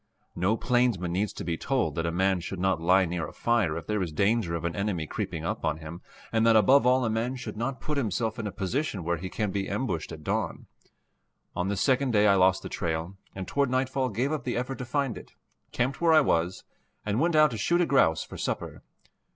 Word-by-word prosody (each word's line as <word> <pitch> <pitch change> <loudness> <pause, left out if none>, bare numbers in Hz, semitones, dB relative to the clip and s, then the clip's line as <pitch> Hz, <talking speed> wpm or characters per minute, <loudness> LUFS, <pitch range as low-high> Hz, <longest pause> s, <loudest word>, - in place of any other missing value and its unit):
No 95 +6 +1
plainsman 120 -9 +1
needs 100 +3 0
to - - -6
be 85 -1 -2
told 135 +5 0
that 85 -1 -2
a - - 0
man 95 +2 +1
should 85 +3 -6
not 95 -3 +1
lie 95 +3 +4
near 85 -2 -3
a - - -10
fire 110 -10 +1
if 85 - -7
there 105 -1 -1
is 85 -4 -2
danger 100 +1 +1
of 85 0 -4
an 85 - -2
enemy 100 -5 -1
creeping - - -4
up - - -3
on 80 0 0
him, 80 +2 -9 0.3
and 110 -1 +2
that 115 -1 +5
above 125 +5 +5
all 130 0 +4
a - - +1
man 115 +4 -1
should 115 -4 -7
not 125 +4 -3
put 150 -1 -2
himself 110 0 -1
in 110 - -3
a - - -4
position 100 - -2
where 85 +1 0
he 95 +4 -6
can 105 0 -2
be 100 0 -2
ambushed 100 - -2
at 80 -2 -9
dawn. - - -2 0.9
On 90 - -1
this 100 -1 -1
second 130 -2 +2
day 105 -1 +4
I 100 - +6
lost 95 -1 +3
the - - -5
trail, 80 +2 -3 0.2
and 95 -1 -5
toward 140 -2 +1
nightfall 130 0 0
gave 125 +7 -1
up 155 - -2
the 120 - -2
effort 125 +2 -3
to 125 - -4
find 130 -3 -1
it, - - -16 0.4
camped 130 +5 -1
where 165 -1 +5
I 155 - +7
was, 90 - 0 0.4
and 105 +2 0
went 170 +2 +2
out 155 -2 +6
to 115 - -4
shoot 170 +11 +2
a 175 - +3
grouse 135 - +3
for - - -10
supper. - - -4
105 Hz, 240 wpm, -27 LUFS, 90-125 Hz, 0.9 s, I